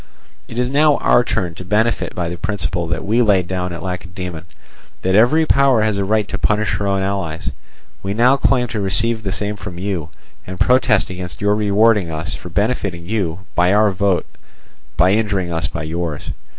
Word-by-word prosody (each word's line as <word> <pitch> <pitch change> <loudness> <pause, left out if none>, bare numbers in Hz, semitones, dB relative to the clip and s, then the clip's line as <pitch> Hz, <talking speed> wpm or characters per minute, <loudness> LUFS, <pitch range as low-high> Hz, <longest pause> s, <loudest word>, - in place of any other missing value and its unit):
It 115 - -9
is 125 +1 0
now 150 +1 +4
our 120 - +3
turn 90 -7 -2
to 85 - -9
benefit 105 +5 0
by 90 -2 -2
the 85 - -4
principle 85 -4 -2
that 85 +3 -3
we 115 +4 +2
laid 100 -6 +3
down 90 0 -3
at 85 - -6
Lacedaemon, 90 -2 -6 0.6
that 95 - +1
every 125 +10 +4
power 135 -6 +3
has 105 -2 0
a - - +1
right 105 +1 +1
to - - -4
punish 105 0 +1
her 100 - -2
own 100 -1 0
allies. 95 -5 -3 0.5
We 100 +1 -3
now 125 +4 +5
claim 130 -2 +2
to 110 - -3
receive 110 +4 +1
the 100 -3 -3
same 105 +2 -2
from 95 -3 -8
you, 90 -4 -3 0.4
and 95 -1 -7
protest 120 -6 +3
against 90 -1 -7
your 105 0 +2
rewarding 105 -2 +3
us 80 +2 -3
for 90 - -7
benefiting 100 -3 -1
you 95 -4 -2
by 90 +2 +3
our 105 -1 +4
vote 95 -1 +1 0.7
by 90 +2 +4
injuring 100 -5 0
us 80 -3 -1
by 80 +1 -5
yours. 80 -1 -4
100 Hz, 190 wpm, -19 LUFS, 90-110 Hz, 0.7 s, now